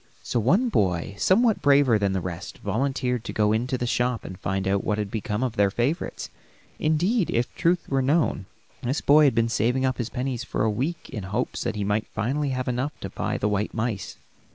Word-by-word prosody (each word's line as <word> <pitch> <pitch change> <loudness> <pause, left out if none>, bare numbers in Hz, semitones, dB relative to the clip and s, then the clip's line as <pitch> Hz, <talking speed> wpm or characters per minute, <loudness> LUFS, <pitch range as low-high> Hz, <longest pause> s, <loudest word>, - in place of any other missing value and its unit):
So 120 - -1
one 190 - +3
boy, 95 - 0
somewhat 220 +3 +3
braver 140 -6 +5
than 100 -2 +1
the 95 - -1
rest, 85 -2 -6
volunteered 130 -3 -1
to - - -5
go 105 0 +2
into 125 +4 0
the 120 - -2
shop 120 0 0
and 95 - -6
find 95 0 -2
out 100 0 +1
what 105 - 0
had 105 -2 -3
become 110 +1 -2
of 120 -3 -2
their 100 -1 +4
favorites; 120 - -2 0.5
indeed, 175 +7 +1
if 120 +1 0
the - - -13
truth 170 +1 +2
were 135 -1 +1
known, 135 - +1 0.3
this 130 +5 -1
boy 150 +1 +6
had 135 -5 +3
been 115 0 +3
saving 120 +4 +1
up 130 0 -1
his 120 -1 -2
pennies 125 -1 -3
for 125 - -2
a 110 - +2
week 145 +12 -3
in 115 -6 -4
hopes 95 +3 -2
that - - -1
he 105 - -2
might 105 +2 0
finally 140 +7 -1
have 130 -1 -2
enough 130 +4 -2
to 95 - -5
buy - - -2
the 105 - 0
white 105 0 -1
mice. 110 -3 -3
120 Hz, 220 wpm, -25 LUFS, 105-140 Hz, 0.5 s, boy